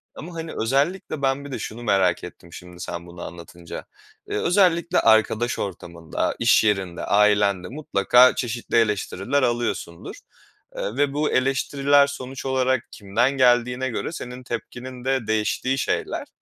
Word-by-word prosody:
ama, 175 +3 -9
hani, 165 -1 -5
özellikle 140 +6 0
ben 135 +1 0
bir 140 - -8
de - - -4
şunu 115 +2 -6
merak 95 -5 +2
ettim 85 -1 -11
şimdi 90 -1 -11
sen 85 -1 -6
bunu 85 0 -11
anlatınca. 85 0 -9 0.4
Iıı, 415 - -1
özellikle 175 -2 +3
arkadaş 110 +1 +3
ortamında, 85 -4 -4
iş 120 -1 +4
yerinde, 95 -5 0
ailenle 100 -3 +3
mutlaka 125 -2 +4
çeşitli 120 -1 -3
eleştiriler 105 +3 0
alıyorsundur, 120 -8 -2 0.6
eee, - - -3
ve 140 -1 +1
bu 150 +1 0
eleştiriler 140 +2 +3
sonuç 135 -1 -7
olarak 130 -2 +1
kimden 110 +6 0
geldiğine 125 0 +3
göre 120 - -3
senin 125 -5 -7
tepkinin 125 +1 -7
de 130 -4 0
değiştiği 110 +4 0
şeyler. - - -2
120 Hz, 140 wpm, -23 LUFS, 100-135 Hz, 0.6 s, iş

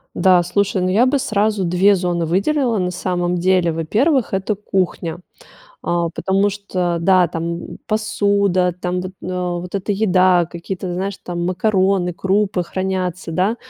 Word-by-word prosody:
Да, 185 -2 +4
слушай, 190 +1 0
ну, 185 - +1
я 220 +7 +4
бы 280 +2 +2
сразу 210 -4 0
2 185 +4 +4
зоны 175 -2 -1
выделила 230 - +1
на 180 0 -1
самом 180 -1 -1
деле. 180 -1 +2
Во-первых, 220 - +1
это 195 +2 -1
кухня. 185 -4 -2 0.6
А, 170 -1 0
потому 195 +3 +1
что, 185 -4 -2
да, 185 0 +4
там 170 +1 -5
посуда, 200 -4 +1
там 180 0 -1
вот, 185 0 -6
на 180 -1 -3
вот 180 +2 -7
эта 200 +1 -2
еда, 185 -4 +3
какие-то, 180 +1 -5
знаешь, 195 +2 -3
там 175 -1 -3
макароны, 185 -1 +1
крупы 190 +1 0
хранятся, 185 -2 -3
да, 195 +7 +1
185 Hz, 150 wpm, -19 LUFS, 175-200 Hz, 0.6 s, Да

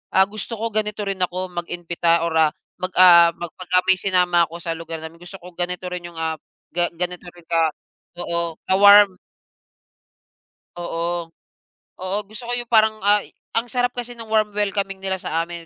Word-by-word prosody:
ah, 190 - +7
gusto 215 +2 -6
ko 230 +1 -1
ganito 210 -1 -1
rin 195 -1 -3
ako 180 +1 -2
mag-imbita 170 -1 0
or, - - -3
ah, 155 -1 +4 0.3
mag 185 0 -3
ah, 170 -2 +8
mag 175 -1 -7
'pagka 180 0 +2
may 190 -1 +5
sinama 180 -3 +3
ako 165 - -11
sa 165 - -2
lugar 165 -1 -7
namin, 165 +1 -10
gusto 175 +2 -11
ko 180 +1 -12
ganito 180 +1 -3
rin 180 -1 -5
'yong, 170 - -13
ah, 160 -1 -2 0.4
ga 175 0 +2
ganito 180 0 -4
rin 175 -1 -18
ka 165 -2 +2 0.5
oo, 170 -1 -1
ka-warm. 200 0 +7 1.6
Oo. 170 -1 -3 0.7
Oo, 185 +2 -1
gusto 215 +3 -10
ko 245 - -1
'yong 240 -1 -5
parang, 220 -1 +4
ay, 205 0 +2 0.2
ang 230 +2 +1
sarap 245 -1 +1
kasi 245 0 -5
no'ng 230 -1 -10
warm 215 -1 +3
welcoming 200 -1 -1
nila 190 -1 0
sa 165 - -2
amin, 170 0 -8
180 Hz, 180 wpm, -21 LUFS, 170-205 Hz, 1.6 s, ah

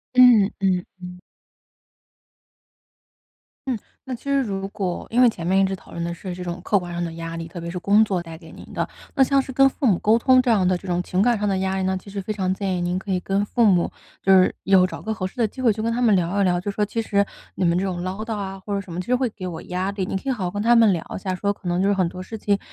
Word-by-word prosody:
嗯 240 -6 +7
嗯 185 -2 +1 0.2
嗯。 180 0 -9 2.5
嗯， 245 -5 -1 0.2
那 260 - -6
其 240 - -8
实 280 0 +2
如 195 -5 -3
果 185 -3 -4
因 240 +2 +3
为 245 - +7
前 170 -6 -5
面 190 +2 +3
一 195 - +5
直 190 0 0
讨 190 - -10
论 170 - -4
的 170 0 -3
是 180 +2 -7
这 180 - -6
种 175 0 -5
客 205 - +3
观 175 -2 -4
上 175 0 -3
的 165 -1 -4
压 165 0 -6
力， 165 - -5
特 170 +1 -8
别 170 - -5
是 180 - -4
工 205 +4 +4
作 195 -4 -1
带 165 -1 -9
给 160 -1 -14
您 - - -12
的， - - -1 0.3
那 270 - +5
像 275 +1 +3
是 265 - -8
跟 270 +1 +5
父 275 - -4
母 190 - +4
沟 220 +2 +3
通 255 +2 +5
这 250 -2 +1
样 195 -5 +3
的 185 - +2
这 185 - -14
种 180 -1 0
情 180 +1 -1
感 235 0 +3
上 210 - 0
的 195 -1 +1
压 190 0 -1
力 190 - -1
呢， 190 0 0
其 185 - -11
实 200 0 -4
非 215 +3 -3
常 190 -2 -1
建 190 -1 -2
议 175 - -2
您 175 +1 -1
可 200 - -11
以 185 -1 0
跟 195 +2 0
父 235 +3 +1
母， 180 -5 +3 0.3
就 195 - +4
是， 185 -1 +5
有 190 -1 +5
找 185 - -6
个 220 - -2
合 210 -4 -4
适 185 - -7
的 230 - +2
机 260 +5 -9
会 235 - +4
去 215 +1 -3
跟 230 - 0
他 245 - -1
们 230 -4 +4
聊 185 +2 +1
一 - - +4
聊， 180 -1 +2
就 185 - -4
说： 210 +1 -1
“其 220 +2 -2
实 200 -2 +1 0.3
你 - - -2
们 170 0 +3
这 190 - 0
种 180 -2 -3
唠 185 +3 -4
叨 225 0 -3
啊， 195 -1 -5
或 200 +2 -4
者 200 - -1
什 195 - -12
么， 170 - -4
其 180 - -4
实 250 - +2
会 250 -1 0
给 185 -3 -7
我 165 -3 -6
压 185 +2 -2
力。” 200 -1 -3
你 195 - -2
可 - - -9
以 270 - +2
好 215 -7 -3
好 175 - -2
跟 205 +2 -3
他 235 +2 +4
们 225 -3 +6
聊 170 -3 0
一 - - -3
下， 190 -1 -3
说 200 +2 -1
可 205 - -24
能 175 +1 +1
就 195 - +2
是 205 - +3
很 185 -3 +1
多 180 - -8
事 220 +4 -7
情， 205 -1 0
195 Hz, 335 characters per minute, -23 LUFS, 180-215 Hz, 2.5 s, 嗯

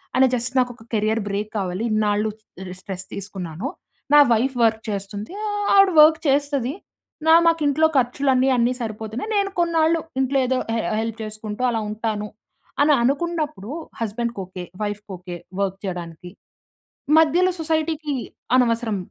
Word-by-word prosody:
అని 265 - +6
జస్ట్ 245 +2 -3
నాకు 250 -1 +1
ఒక 225 - -16
కేరియర్ 220 +1 +1
బ్రేక్ 205 +2 -2
కావాలి. 185 +3 -3
ఇన్నాళ్ళు 210 0 +1 0.5
స్ట్రెస్ 190 -1 -6
తీసుకున్నాను. 190 - -5 0.5
నా 295 - +9
వైఫ్ 250 +4 +2
వర్క్ 220 -1 +3
చేస్తుంది. 205 - -5 0.4
ఆవిడ 390 -1 +6
వర్క్ 310 +1 +8
చేస్తది. 280 -2 +1 0.5
న - - -2 0.2
మాకు 330 -1 +3
ఇంట్లో 310 +3 +4
ఖర్చులు 265 +3 +1
అన్ని 260 +1 +3
అన్ని 240 +1 +2
సరిపోతున్నాయి. 220 - -5
నేను 400 -1 +2
కొన్నాళ్ళు 330 -1 +2 0.2
ఇంట్లో 265 +1 +1
ఏదో 260 +1 +1 0.2
హె 230 - 0 0.2
హెల్ప్ 225 0 -3
చేసుకుంటూ 215 +1 -6
అలా 225 -2 0
ఉంటాను 215 -1 -3 0.6
అని 300 0 +5
అనుకున్నప్పుడు, 295 - -1 0.3
హస్బాండ్‌కి 230 0 -3
ఓకే. 185 0 -8 0.2
వైఫ్‌కి 205 0 -5
ఓకే. 175 0 -8 0.2
వర్క్ 195 -1 -1
చేయడానికి 175 -1 -6 0.9
మధ్యలో 350 +4 +4
సొసైటీకి 315 -1 -1 0.4
అనవసరం. 230 -4 +2
230 Hz, 140 wpm, -22 LUFS, 210-290 Hz, 0.9 s, నా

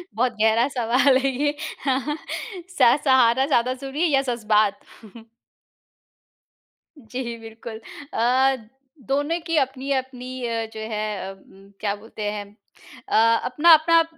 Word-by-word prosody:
बहुत 245 +1 +1
गहरा 225 +3 +4
सवाल 255 +3 +3
है 270 +1 +1
ये। 290 +3 -1 0.3
हाँ, 265 -1 +2
हाँ। 300 +1 -2 0.5
स 265 -6 +4
सहारा 260 -1 +4
ज़्यादा 255 -3 +1
ज़रूरी 275 +4 -6
है 350 - +4
या 275 -3 +3
ज़ज़्बात? 215 -5 +1 2.2
जी, 240 -1 -6
बिल्कुल 225 0 -9 0.3
अ, 260 +3 +3 0.5
दोनों 290 +5 0
की 330 - -1
अपनी-अपनी 260 -2 -2
अ, 230 -1 -2
जो 220 - -7
है 210 -2 -3
उम, 195 +1 -19
क्या 205 -1 -1
बोलते 215 +1 -9
हैं 205 -1 -5 0.6
अ, - - 0 0.3
अपना-अपना 330 +4 +5
255 Hz, 125 wpm, -23 LUFS, 225-275 Hz, 2.2 s, अपना-अपना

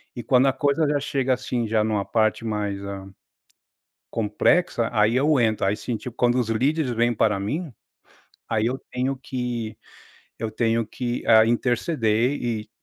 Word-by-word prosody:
E 120 - -5
quando 125 +3 +3
a 135 - +3
coisa 140 +3 +1
já 145 0 +1
chega, 135 -2 0
assim, 120 -2 -2
já 110 0 +2
numa 105 -2 -1
parte 110 0 0
mais, 105 -2 -2
ah, 100 -1 -7 1.0
complexa, 115 - +1
aí 110 +1 +3
eu 145 +1 +3
entro, 110 -4 +1
aí 100 +2 +1
sim, 120 +1 -4
tipo, 125 +1 -8
quando 120 0 +2
os 120 -3 0
líderes 130 +4 +1
vêm 120 +1 +2
para 105 -2 +1
mim, 150 - -3 0.8
aí 110 -1 0
eu 125 +2 0
tenho 130 +2 -1
que 120 -4 -4 0.6
eu 110 0 -3
tenho 115 0 0
que, 120 +1 -4
ah, 110 -1 +7
interceder 120 0 +1
e 110 -3 -3
120 Hz, 165 wpm, -24 LUFS, 110-130 Hz, 1.0 s, ah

